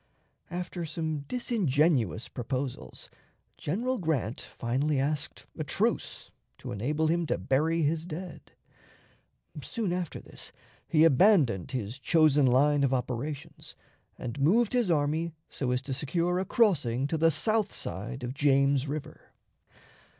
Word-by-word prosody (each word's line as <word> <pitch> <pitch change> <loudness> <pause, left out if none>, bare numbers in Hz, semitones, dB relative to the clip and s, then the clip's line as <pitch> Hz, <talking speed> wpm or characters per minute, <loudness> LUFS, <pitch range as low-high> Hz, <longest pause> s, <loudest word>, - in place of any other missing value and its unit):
After 175 0 -4
some 155 -2 -3
disingenuous 155 - +1
proposals, 125 - -4 0.5
General 240 - -2
Grant 145 - -1
finally 135 +5 -1
asked 145 +2 -2
a - - -3
truce - - -1 0.3
to - - -7
enable 145 +10 -1
him 170 +1 +1
to - - 0
bury 160 +5 +1
his 155 +2 +1
dead. 180 +2 -8 1.1
Soon 220 -7 -2
after 180 -3 -3
this - - -11 0.4
he 155 -1 +4
abandoned 150 - +4
his 125 -1 -4
chosen 150 0 +4
line 140 +3 +4
of 135 -1 +2
operations, 130 +3 -5 0.4
and 125 +3 -5
moved 205 - +3
his 245 -6 +2
army 160 +1 +1 0.2
so 130 - -2
as 125 +1 0
to 135 - -4
secure 170 +6 0
a 190 - -1
crossing 145 - +2
to 145 - -1
the 165 +1 +5
south 215 +7 +1
side 120 +7 -5
of 125 +1 -3
James 140 -1 +3
River. 145 +1 -7
150 Hz, 130 wpm, -29 LUFS, 130-170 Hz, 1.1 s, the